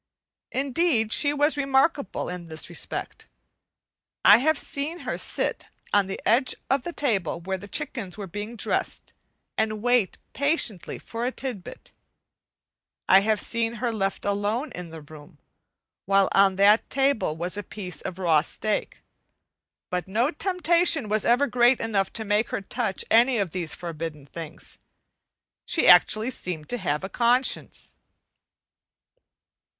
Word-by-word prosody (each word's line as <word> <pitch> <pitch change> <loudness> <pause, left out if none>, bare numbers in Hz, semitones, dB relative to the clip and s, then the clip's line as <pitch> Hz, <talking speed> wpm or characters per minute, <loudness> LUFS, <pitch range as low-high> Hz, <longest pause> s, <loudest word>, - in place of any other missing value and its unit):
Indeed, 265 -4 +1
she 285 - +2
was 295 +1 +2
remarkable 275 - +1
in 180 -1 -6
this 160 -2 -4
respect. - - -4 1.0
I 205 +3 +9
have 315 +3 +2
seen 315 +4 -4
her - - -3
sit - - -1 0.3
on 200 -2 +3
the 195 - -5
edge 255 +3 +3 0.2
of 270 -2 +2
a - - -3
table 205 - -1
where 190 +2 -4
chickens 200 0 -3
were 205 - -5
being 210 +5 -6
dressed - - -3 0.5
and 215 -1 -1
wait 245 -5 +2 0.2
patiently 280 - 0
for 230 +1 -6
a - - -1
tidbit; 250 -9 -7 1.2
I 190 - +7
have 215 +1 +1
seen 230 +1 -1
her 235 +1 -2
left 195 -3 -2
alone 205 +7 -1
in 180 -1 -7
the 160 -1 -9
room, 145 0 -14 0.7
while 195 0 +4
on 195 -1 +4
that 205 +3 +4
table 270 - +1
was 175 +3 -2
a 205 - -3
piece 185 -5 -5
of 180 - -6
raw 165 -5 +3
steak, 215 +6 -3 0.9
but 180 +1 -2
no 230 +9 +1
temptation 340 - +2
was 215 0 0
ever 245 +4 +4
great 245 -1 +3
enough 205 -4 -1
to 220 - -3
make 210 +2 +1
her - - -3
touch 205 0 -2
any 240 +2 +5
of 195 -5 -1
these 170 -3 -3
forbidden 160 -4 -6
things. 160 +2 -7 0.9
She 320 - +3
actually 215 +7 +6
seemed 170 - -5
to 245 - -2
have 150 -5 -2
a - - -2
conscience. 245 +5 0
215 Hz, 145 wpm, -25 LUFS, 185-255 Hz, 1.2 s, I